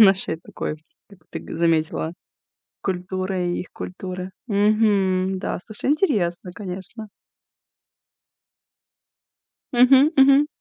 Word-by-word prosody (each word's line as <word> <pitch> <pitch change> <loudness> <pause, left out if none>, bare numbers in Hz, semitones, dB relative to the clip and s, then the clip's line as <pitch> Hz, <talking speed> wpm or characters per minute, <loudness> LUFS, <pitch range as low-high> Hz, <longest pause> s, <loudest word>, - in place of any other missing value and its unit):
нашей 195 -5 +5
такой, 155 - -5 0.3
как 200 - -17
ты - - -5
г - - -9
заметила, 160 -1 +1 0.7
культуры 185 0 -2
и 175 - -1
их - - -8
культуры. 185 0 -6 0.2
Мгм. 200 -3 +2
Да, - - -3
слушай, 215 +4 -3
интересно, 195 - 0
конечно. 195 +3 -7 2.7
Мгм, 265 +4 +6
мгм. 275 +2 +6
190 Hz, 95 wpm, -23 LUFS, 180-220 Hz, 2.7 s, Мгм